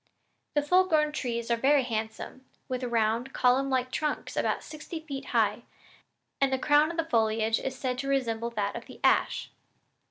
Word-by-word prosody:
The 295 - +3
full 365 +5 +4
grown 305 -3 +2
trees 235 -5 -3
are - - +4
very 275 +4 +3
handsome, 225 +2 -5 0.2
with 255 0 -3
round 235 +1 0
column 260 +2 +3
like 255 -1 0
trunks 300 +1 -2
about - - 0
sixty 315 +2 -7
feet 280 -4 -6
high, 220 -2 +1 0.8
and 275 -1 +3
the 265 - +2
crown 300 +4 +3
of 325 - 0
foliage 220 -1 +2
is 265 -1 -4
said 255 -1 -2
to 275 - -3
resemble 235 -4 0
that 205 -3 -2
of 235 - -7
the - - -12
ash." - - +2
255 Hz, 170 wpm, -28 LUFS, 230-290 Hz, 0.8 s, full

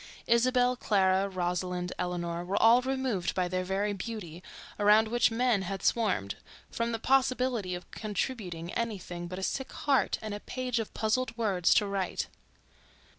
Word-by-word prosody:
Isabelle, 250 +1 +3
Clara, 195 -4 +2
Rosalind, 180 -1 -2
Eleanor, 175 -1 -2
were 185 +3 -1
all 235 +2 +6
removed 260 -8 -1
by 185 -1 +1
their 185 +1 -1
very 195 +3 -1
beauty, 190 -5 -6 0.4
around 210 +2 +5
which 240 +2 +3
men 235 -2 +2
had 190 0 -4
swarmed, 190 - +1 0.3
from 230 0 -1
the 225 - -1
possibility 255 -6 +1
of 175 - -10
contributing 195 -6 -4
anything 185 -6 -4
but 185 +1 -6
a 190 - -5
sick 265 +6 -2
heart 280 -2 +1
and 215 -1 -5
a 205 - -4
page 250 +1 -3
of 225 - -4
puzzled 225 +2 0
words 195 -6 +2
to 210 - +4
write. 195 -2 -2
205 Hz, 155 wpm, -30 LUFS, 180-235 Hz, 0.4 s, all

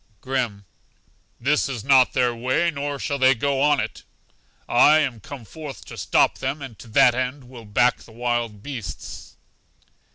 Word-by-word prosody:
Grim: 120 -7 -3 0.7
This 140 +4 +1
is 120 -6 -5
not 135 -1 +5
their 125 -2 +2
way, 130 +9 +1
nor 145 -1 -4
shall 140 +1 -3
they 130 0 +5
go 135 +2 0
on 145 -1 +4
it. - - -4 0.7
I 150 +5 +6
am 135 -7 0
come 120 +3 -10
forth 140 +6 -9
to - - -10
stop - - +2
them, 135 +3 -2
and 135 -5 -8
to - - -12
that 125 +2 +5
end 130 +2 -3
will 120 -3 -12
back 120 +4 +2
the - - -16
wild 120 -3 -2
beasts. 115 - -8
130 Hz, 165 wpm, -23 LUFS, 120-140 Hz, 0.7 s, I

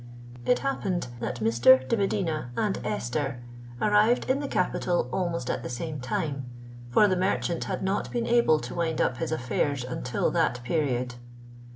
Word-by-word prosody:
It 250 - +5
happened 185 - -1
that 120 0 -4
Mr. 120 +4 +5
de - - +2
Medina 185 - -1
and 210 -3 0
Esther 135 - -2 0.4
arrived 210 - +3
in 260 +2 +2
the 285 - -3
capital 180 - 0
almost 170 -8 -1
at - - -1
the - - -6
same 150 +4 -4
time; 135 +1 -2 0.4
for 205 - +5
the 185 - +2
merchant 180 -2 0
had - - -3
not 190 +1 -1
been 235 -1 -1
able 235 -10 +4
to 120 - -6
wind 165 -2 -1
up 125 - +1
his 165 +1 -3
affairs 140 -1 -1
until 125 -1 -1
that 120 0 +1
period. 125 -3 0
160 Hz, 165 wpm, -27 LUFS, 125-195 Hz, 0.4 s, It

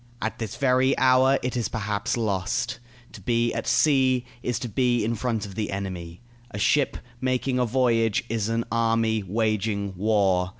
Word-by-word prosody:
At 110 - -3
this 110 -4 -4
very 130 +1 +2
hour 130 +1 +4
it 125 0 -2
is 115 -4 -1
perhaps 105 +1 -2
lost. 110 +3 -1 0.3
To 100 - -12
be 115 +3 +1
at 115 - -4
sea 130 -4 +3 0.2
is 125 -3 -1
to 120 - -4
be 120 0 +1
in 115 - 0
front 115 -2 -2
of 100 - -9
the 105 +2 -3
enemy. 90 -3 -5 0.3
A 105 - -7
ship 140 +7 +2 0.2
making 130 0 0
a 125 - +2
voyage 115 -3 +2
is 115 -2 -1
an 115 +1 0
army 115 -1 +1
waging 100 -1 -1
war. 95 -2 +2
115 Hz, 170 wpm, -25 LUFS, 100-125 Hz, 0.3 s, hour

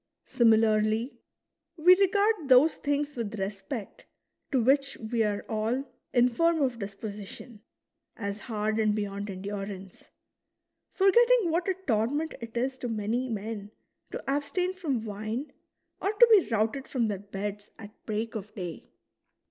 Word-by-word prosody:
Similarly, 220 +1 +2 0.6
we 355 +3 +7
regard 400 -4 +2
those 265 +5 +6
things 290 0 -1
with 225 -3 -4
respect 200 +4 -5 0.4
to 265 - +3
which 275 +3 +2
we 225 0 -1
are 205 -1 -2
all 225 +5 -1 0.3
infirm 260 +7 +3
of 250 -3 -1
disposi 200 0 -6
tion, 220 0 -11 0.6
as 200 -1 -4
hard 215 -1 -2
and 215 -1 +2
beyond 205 -1 -3
endurance, 195 0 -7 0.8
forgetting 460 0 +4
what 345 +3 0
a 375 - +1
torment 270 +7 0
it 230 0 -7
is 260 +2 -1
to 245 - -3
many 225 +4 -1
men 210 -1 -5 0.4
to - - -6
abstain 290 +7 0
from 285 -12 -2
wine 215 +7 -4 0.5
or 395 - +1
to 470 +3 +6
be 410 -5 +6
routed 225 +4 0
from 240 -4 0
their 205 -3 -2
beds 205 +1 -6
at 205 -1 -10 0.2
break 220 +1 -2
of 210 -1 -7
day. 175 -4 -7
225 Hz, 140 wpm, -28 LUFS, 210-285 Hz, 0.8 s, we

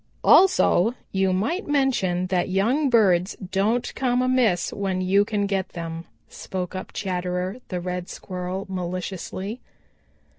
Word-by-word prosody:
"Also 245 - +5 0.2
you 190 -1 +1
might 225 - -1
mention 245 -11 +1
that 180 -1 0
young 240 +10 +2
birds 195 -6 +3
don't 200 +6 -1
come 250 -1 +1
amiss 250 -8 +2
when 195 -2 -2
you 190 +2 +3
can 205 -1 -1
get 195 -2 -1
them," 165 -1 -6 0.2
spoke 185 -1 -5
up 185 - -6
Chatterer 180 +1 -3
the 180 - -3
Red 180 0 -4
Squirrel 185 +1 -5
maliciously. 185 +3 -4
190 Hz, 125 wpm, -24 LUFS, 180-220 Hz, 0.2 s, Also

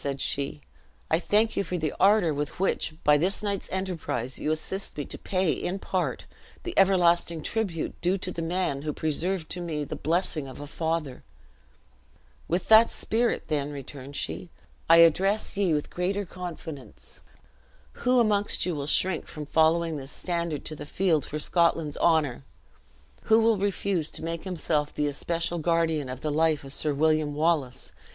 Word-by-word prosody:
said 140 -1 -2
she, 140 +2 -2 0.5
"I 160 - +4
thank 215 +5 +2
you - - +1
for 180 0 -3
the 155 -3 -2
ardor 195 -5 +5
with 145 +3 -4
which, 185 -4 0
by 150 0 +5
this 185 +6 0
night's 200 -2 -2
enterprise, 165 -10 -3
you - - -1
assist 160 +5 -3
me 145 - -2
to - - -5
pay, 185 -3 +1
in 180 +2 -2
part, 185 -2 -2 0.4
the 355 - -4
everlasting 175 -4 +3
tribute 195 -8 -2
due 180 +3 +2
to 185 -1 -4
the 170 - -4
man 165 -4 -1
who 150 0 -3
preserved 160 +3 -2
to 180 - -4
me 155 -4 -2
the - - -5
blessing 160 -2 -1
of 130 - -10
a 145 - -6
father. 160 -3 -3 1.2
"With 175 +2 -1
that 220 +1 +8
spirit, 235 +2 -1
then," 145 -2 -1
returned 140 0 -8
she, 85 -3 -3 0.4
"I 165 - +8
address 195 +7 +1
ye 195 -3 +2
with 150 -1 -1
greater 195 +3 -1
confidence. 160 - -8 0.8
Who 250 +1 +4
amongst 210 -3 +2
you 180 - -1
will 145 -2 -4
shrink 180 +2 +1
from 150 -2 -7
following 160 +1 +2
this 135 -1 -7
standard 170 -3 -3
to 155 - -6
the 150 - -8
field 170 -5 +1
for 150 - -4
Scotland's 165 -1 +1
honor? 155 -7 +2 0.8
Who 220 0 +5
will 225 -2 +3
refuse 195 -4 0
to - - -9
make 165 +1 -4
himself 155 -5 -1
the 150 - -1
especial 165 +4 -1
guardian 160 -4 +1
of 130 0 -6
the 150 - -1
life 155 -1 +2
of 135 0 -5
Sir 150 - +1
William 155 0 +2
Wallace? 150 -5 0
165 Hz, 170 wpm, -27 LUFS, 150-185 Hz, 1.2 s, that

